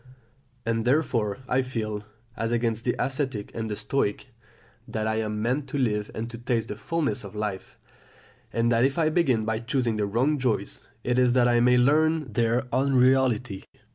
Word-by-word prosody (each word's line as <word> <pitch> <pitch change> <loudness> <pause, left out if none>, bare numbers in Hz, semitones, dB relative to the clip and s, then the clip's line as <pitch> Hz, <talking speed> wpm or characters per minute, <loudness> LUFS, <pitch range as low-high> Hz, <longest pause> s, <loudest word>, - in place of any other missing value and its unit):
And, 115 0 0
therefore, 120 -6 +1
I 130 +1 +2
feel, 110 -5 -4 0.3
as 115 0 -2
against 115 -1 0
the 120 - +1
Ascetic 130 -4 -2
and 115 -1 -4
the 105 - -2
Stoic, 105 -3 -1 0.6
that 110 -1 -3
I 110 0 0
am 105 -1 -2
meant 130 +5 0
to 145 - -3
live 105 -5 0
and 115 +1 -3
to 115 - -8
taste 120 -1 -1
the 105 - -4
fulness 145 -1 -2
of 100 0 -10
life; 105 -3 -4 0.7
and 115 +1 +1
that 115 0 +3
if 135 +1 +1
I 160 -2 +3
begin 135 -10 +2
by 110 0 -1
choosing 120 -1 -1
the 105 -1 0
wrong 130 +8 +1
joys, 125 -4 -2 0.2
it 125 +1 +1
is 125 -1 +4
that 125 -1 +4
I 120 -1 +3
may 125 +1 +5
learn 150 0 +2
their 120 +3 +1
unreality. 130 -5 +2
120 Hz, 180 wpm, -26 LUFS, 110-130 Hz, 0.7 s, may